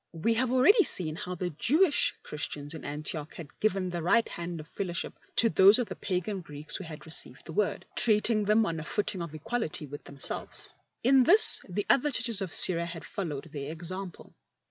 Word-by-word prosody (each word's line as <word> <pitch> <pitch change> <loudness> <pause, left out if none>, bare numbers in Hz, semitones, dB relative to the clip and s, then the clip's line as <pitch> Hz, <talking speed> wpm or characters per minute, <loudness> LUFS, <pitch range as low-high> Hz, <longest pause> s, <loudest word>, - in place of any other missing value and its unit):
We 170 +8 0
have 245 +2 0
already 345 - +5
seen 155 - +2
how 180 +2 -5
the 180 0 -3
Jewish 295 - +2
Christians 145 0 -5
in 160 - -8
Antioch 150 +1 -5
had 155 -4 -11
given 190 -3 0
the 175 -1 -3
right 225 +8 +3
hand 170 -1 -6
of 155 - -9
fellowship 175 -1 -4 0.2
to 230 - +5
those 200 -1 +7
of 245 -3 -1
the - - -5
pagan 185 +1 -3
Greeks 150 -2 -8
who 190 - -4
had 155 -3 -10
received 155 -5 -3
the 160 - -8
Word, 205 +3 -1
treating 215 -1 +2
them 215 +2 +3
on 165 -4 -3
a - - -6
footing 200 +1 -2
of 165 -2 -6
equality 160 -1 -3
with 145 +1 -10
themselves. 140 -1 -5 0.3
In 260 +2 +5
this 440 +6 +7
the 200 +3 -2
other 285 +3 +3
Churches 230 -5 -1
of 190 -4 -4
Syria 170 -2 +4
had 170 -1 -8
followed 160 -5 -5
their 145 0 -5
example. 180 +3 -6
180 Hz, 195 wpm, -29 LUFS, 160-220 Hz, 0.3 s, those